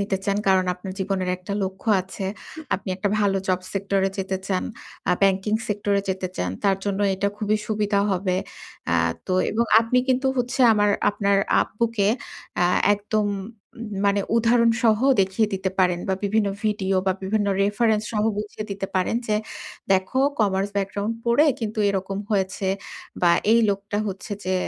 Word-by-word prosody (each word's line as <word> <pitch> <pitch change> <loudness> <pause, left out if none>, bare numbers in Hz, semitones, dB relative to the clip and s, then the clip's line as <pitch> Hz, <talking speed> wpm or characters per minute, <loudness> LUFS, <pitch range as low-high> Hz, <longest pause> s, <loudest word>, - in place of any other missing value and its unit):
নিতে 200 -1 0
চান। 200 0 +1
কারণ 190 -1 +4
আপনার 185 +1 -8
জীবনের 190 -1 -1
একটা 185 +2 -7
লক্ষ্য 190 +3 -4
আছে। 190 +1 -6 0.5
আপনি 190 - -6
একটা 195 +2 -1
ভালো 200 -2 +2
জব 185 0 +2
সেক্টরে 195 0 0
যেতে 190 0 -1
চান। 190 -2 -1 0.5
আ - - +5
ব্যাংকিং 195 +2 +2
সেক্টরে 205 -1 0
যেতে 190 -1 -2
চান। 90 - -1
তার 195 -1 +3
জন্য 200 -1 -1
এটা 200 +2 0
খুবই 215 0 +1
সুবিধা 210 -1 +1
হবে। 185 -1 0 0.6
আ - - +3 0.3
তো 185 - 0 0.2
এবং 230 +3 +1 0.2
আপনি 235 +2 +1
কিন্তু 260 +1 +2
হচ্ছে 250 +2 -1
আমার 205 -1 +3 0.2
আপনার 200 -1 +1 0.3
আব্বুকে 225 -2 0 0.5
আ - - +4 0.3
একদম 210 +1 -1 0.8
মানে 200 0 +2 0.2
উদাহরণসহ 230 -1 +3 0.2
দেখিয়ে 190 +3 +2
দিতে 190 0 -2
পারেন 180 -2 +3
বা 190 - +2
বিভিন্ন 205 0 +1 0.2
ভিডিও 195 -3 0
বা 190 - +4
বিভিন্ন 205 +2 0 0.2
রেফারেন্স 210 +1 +2
সহ 210 0 +1
বুঝিয়ে 210 0 -5
দিতে 195 0 -3
পারেন। 185 +5 +1
যে, 210 - +2 0.6
দেখো 190 +7 +1 0.2
কমার্স 195 -1 +1
ব্যাকগ্রাউন্ড 200 +2 -1
পড়ে 235 +6 +4
কিন্তু 220 -1 -4
এরকম 195 0 -2
হয়েছে। 190 -1 0 0.5
বা 175 - +6 0.2
এই 230 - +6
লোকটা 200 +1 -3
হচ্ছে 195 +3 -6
যে, 185 0 0
200 Hz, 160 wpm, -23 LUFS, 190-215 Hz, 0.8 s, বা